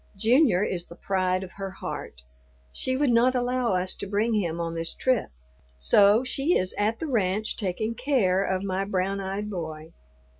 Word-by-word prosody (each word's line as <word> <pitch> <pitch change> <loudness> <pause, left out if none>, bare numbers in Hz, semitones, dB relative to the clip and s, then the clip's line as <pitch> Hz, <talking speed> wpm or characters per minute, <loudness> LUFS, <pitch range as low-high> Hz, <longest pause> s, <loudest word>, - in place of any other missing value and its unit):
Junior 225 - +3
is 175 -4 -2
the 170 - -11
pride 185 0 0
of 185 - -9
her 195 -1 -4
heart. 65 - -7 0.5
She 260 - -2
would 285 -2 +2
not 245 +2 +4
allow 245 -2 0
us 185 +1 -1
to - - -5
bring 210 +4 0
him 170 -6 -1
on 165 -1 -2
this 165 0 -2
trip, 255 -4 +1 0.5
so 200 - +5
she 275 +6 +1
is 185 0 -2
at 215 +2 0
the - - -3
ranch 215 -6 0
taking 215 +3 -2
care 230 -7 +1
of 190 -1 -1
my 190 0 -1
brown 195 0 -1
eyed 195 +2 -3
boy. 160 -5 -6
200 Hz, 180 wpm, -26 LUFS, 185-235 Hz, 0.5 s, so